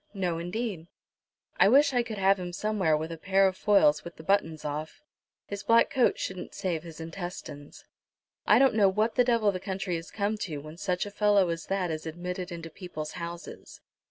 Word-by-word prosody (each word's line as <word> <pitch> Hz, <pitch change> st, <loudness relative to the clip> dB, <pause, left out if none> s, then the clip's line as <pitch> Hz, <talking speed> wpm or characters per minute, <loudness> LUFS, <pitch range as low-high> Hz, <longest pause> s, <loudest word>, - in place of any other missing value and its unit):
"No, 180 Hz, -4 st, -1 dB
indeed." 180 Hz, -1 st, -4 dB, 0.7 s
"I -, -, +7 dB
wish 280 Hz, +3 st, +5 dB
I 245 Hz, -, +3 dB
could 230 Hz, -3 st, -6 dB
have 195 Hz, 0 st, +3 dB
him 175 Hz, -1 st, -5 dB
somewhere 190 Hz, -6 st, +1 dB
with 160 Hz, +2 st, -4 dB
a 165 Hz, -, -7 dB
pair 195 Hz, +2 st, +3 dB
of 190 Hz, -, -2 dB
foils 195 Hz, -8 st, +4 dB
with 170 Hz, -, -9 dB
the 160 Hz, -, -12 dB
buttons 165 Hz, -4 st, 0 dB
off. 155 Hz, -, -5 dB, 0.4 s
His 200 Hz, 0 st, -6 dB
black 230 Hz, 0 st, +4 dB
coat 265 Hz, -3 st, +3 dB
shouldn't 185 Hz, -1 st, -5 dB
save 170 Hz, -4 st, -2 dB
his 165 Hz, -1 st, -11 dB
intestines. 165 Hz, -3 st, -8 dB, 0.6 s
I -, -, +7 dB
don't 270 Hz, -1 st, +5 dB
know 205 Hz, -3 st, +5 dB
what 215 Hz, +4 st, +1 dB
the 250 Hz, -, +4 dB
devil 230 Hz, -4 st, +3 dB
the 185 Hz, -, -4 dB
country 190 Hz, -2 st, -3 dB
is 165 Hz, -, -9 dB
come 210 Hz, +1 st, -2 dB
to, 165 Hz, -8 st, -4 dB
when 155 Hz, +3 st, -9 dB
such 180 Hz, -1 st, -1 dB
a 205 Hz, -, -7 dB
fellow 205 Hz, -3 st, +3 dB
as 165 Hz, -1 st, -4 dB
that 190 Hz, -3 st, -1 dB
is 155 Hz, 0 st, -5 dB
admitted 180 Hz, +3 st, -5 dB
into 165 Hz, -1 st, -7 dB
people's 155 Hz, -5 st, -7 dB
houses." 170 Hz, -1 st, -8 dB
185 Hz, 200 wpm, -28 LUFS, 165-205 Hz, 0.7 s, I